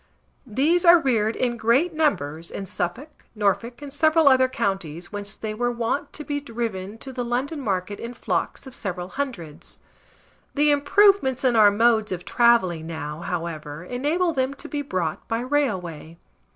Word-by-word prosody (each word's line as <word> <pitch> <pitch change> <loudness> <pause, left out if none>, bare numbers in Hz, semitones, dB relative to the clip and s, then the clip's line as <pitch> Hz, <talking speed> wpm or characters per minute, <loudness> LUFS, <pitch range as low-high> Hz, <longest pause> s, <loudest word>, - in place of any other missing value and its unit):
These 295 +10 +2
are 345 -1 +8
reared 230 -6 +1
in 240 -2 -1
great 245 +10 +2
numbers 165 - -1
in 195 - -6
Suffolk, 190 - -5
Norfolk, 225 +5 -1
and 280 -1 -7
several 315 +1 +3
other 260 -1 +6
counties, 180 -8 -3
whence 205 -1 -3
they 215 -1 -5
were 240 +3 -1
wont 235 +3 -2
to 300 - -5
be 290 -1 -2
driven 225 -6 -5
to 265 +3 -9
the 250 -1 -3
London 255 +6 -2
market 200 -3 -2
in 235 +1 -7
flocks - - -2
of 265 - -10
several 180 -4 -4
hundreds; 215 - -6 0.8
the 295 +1 +4
improvements 290 -2 +3
in 250 -2 +3
our 215 -2 +7
modes 220 0 +2
of 180 -1 -4
travelling 190 -9 +3
now, 155 -2 -5
however, 165 -3 -5
enable 300 - 0
them 265 0 -1
to - - -7
be 290 - -3
brought 185 - -3
by 225 - -1
railway. 190 - -2
235 Hz, 165 wpm, -24 LUFS, 185-280 Hz, 0.8 s, are